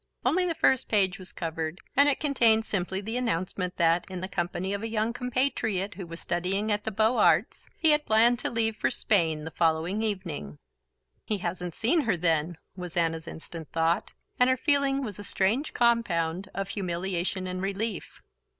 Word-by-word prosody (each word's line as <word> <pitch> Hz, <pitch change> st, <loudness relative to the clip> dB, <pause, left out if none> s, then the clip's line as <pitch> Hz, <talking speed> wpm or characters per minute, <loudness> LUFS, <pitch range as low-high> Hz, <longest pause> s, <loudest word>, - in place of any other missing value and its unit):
Only 360 Hz, +2 st, +2 dB
the 335 Hz, -, -1 dB
first 260 Hz, -4 st, +2 dB
page 195 Hz, -2 st, +2 dB
was 185 Hz, 0 st, -11 dB
covered, 165 Hz, 0 st, -4 dB, 0.2 s
and 285 Hz, +1 st, +6 dB
it 280 Hz, -, +1 dB
contained 235 Hz, -7 st, +4 dB
simply 190 Hz, -1 st, -2 dB
the 225 Hz, +4 st, -3 dB
announcement 185 Hz, -5 st, -2 dB
that, 170 Hz, 0 st, +3 dB
in 185 Hz, -1 st, -5 dB
the 185 Hz, -, -4 dB
company 180 Hz, +1 st, -2 dB
of 200 Hz, -, -3 dB
a 225 Hz, -, -3 dB
young 220 Hz, +1 st, 0 dB
compatriot 245 Hz, -6 st, -1 dB
who 185 Hz, -2 st, -8 dB
was 165 Hz, +1 st, -8 dB
studying 190 Hz, +5 st, -1 dB
at 210 Hz, 0 st, -1 dB
the -, -, 0 dB
Beaux 220 Hz, +3 st, +2 dB
Arts, 175 Hz, 0 st, +2 dB
he 320 Hz, -2 st, +4 dB
had 300 Hz, 0 st, +2 dB
planned 230 Hz, +2 st, +5 dB
to -, -, -2 dB
leave 225 Hz, -1 st, 0 dB
for 130 Hz, -, 0 dB
Spain 160 Hz, -2 st, +2 dB
the 160 Hz, -, -6 dB
following 165 Hz, +6 st, +1 dB
evening. 175 Hz, -, -4 dB, 0.7 s
"He 210 Hz, -, -1 dB
hasn't 180 Hz, -1 st, -4 dB
seen 285 Hz, +9 st, +3 dB
her, 225 Hz, -9 st, 0 dB
then!" 165 Hz, -1 st, 0 dB, 0.2 s
was 180 Hz, -2 st, -7 dB
Anna's 165 Hz, -1 st, 0 dB
instant 160 Hz, -1 st, -9 dB
thought; 165 Hz, +1 st, 0 dB, 0.3 s
and 250 Hz, +1 st, +5 dB
her 260 Hz, -, +2 dB
feeling 280 Hz, -1 st, +2 dB
was 210 Hz, -5 st, -6 dB
a -, -, -6 dB
strange 220 Hz, +11 st, 0 dB
compound 190 Hz, -7 st, +1 dB
of 195 Hz, 0 st, -4 dB
humiliation 185 Hz, -1 st, -2 dB
and 185 Hz, 0 st, -4 dB
relief. 200 Hz, +3 st, -4 dB
195 Hz, 185 wpm, -27 LUFS, 175-225 Hz, 0.7 s, and